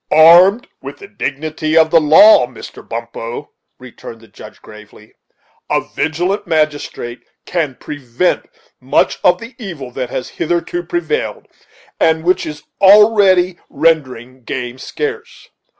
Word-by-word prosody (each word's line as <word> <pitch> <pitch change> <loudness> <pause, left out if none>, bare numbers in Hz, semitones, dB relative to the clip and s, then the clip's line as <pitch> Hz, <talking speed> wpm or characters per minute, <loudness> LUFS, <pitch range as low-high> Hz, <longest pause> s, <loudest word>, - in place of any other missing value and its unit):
"Armed 175 - +6
with - - -9
the 400 - -12
dignity 155 - -3
of 160 -1 +4
the 165 - +5
law, 155 - +6
Mr. 125 - -12
Bumppo," 115 +3 -7 0.3
returned 120 -2 -12
the 115 - -18
Judge, 100 - -14
gravely, 105 0 -16 0.6
"a - - +1
vigilant 180 +7 -2
magistrate 150 -6 -2 0.2
can 155 -7 -2
prevent 145 +4 -3 0.3
much - - 0
of - - +4
the 230 +2 -11
evil 165 - -8
that 125 0 -5
has 125 - -5
hitherto 175 - -3
prevailed, 360 +8 -4 0.5
and 160 0 +2
which 180 +2 0
is 150 -1 -8 0.2
already 195 -3 +5
rendering 135 -5 -1
the - - -28
game 125 +1 -6
scarce. 450 - -6
160 Hz, 130 wpm, -16 LUFS, 130-190 Hz, 0.6 s, Armed